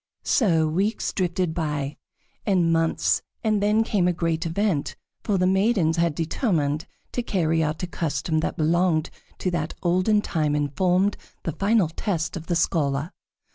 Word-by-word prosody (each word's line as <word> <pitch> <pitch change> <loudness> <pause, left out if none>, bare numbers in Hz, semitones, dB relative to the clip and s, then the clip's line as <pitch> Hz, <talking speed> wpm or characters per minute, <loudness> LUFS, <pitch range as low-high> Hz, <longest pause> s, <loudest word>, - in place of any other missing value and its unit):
So 165 - +3
weeks 195 +8 -1
drifted 180 -2 0
by, 150 -4 -2 0.5
and 180 -5 +2
months, 165 0 +1 0.2
and 215 -2 +1
then 210 +2 +3
came 200 -5 +1
a 180 - +2
great 165 -1 -1
event, 175 -3 -1 0.3
for 205 -3 +1
the 180 - +2
maidens 190 -3 +2
had 170 -2 +1
determined 160 - 0 0.2
to 245 - -1
carry 165 -8 +1
out 155 +3 -2
a - - +2
custom 160 -2 -1
that 160 - -2
belonged 165 0 +2 0.3
to 185 - -1
that 160 -2 -2
olden 185 +4 +3
time 150 -6 0
and 145 -2 -1
formed 190 +2 +2 0.3
the 165 - -2
final 200 0 +2
test 165 -1 -2
of 165 -2 -7
the 175 - 0
scholar. 145 -1 0
170 Hz, 160 wpm, -24 LUFS, 160-190 Hz, 0.5 s, So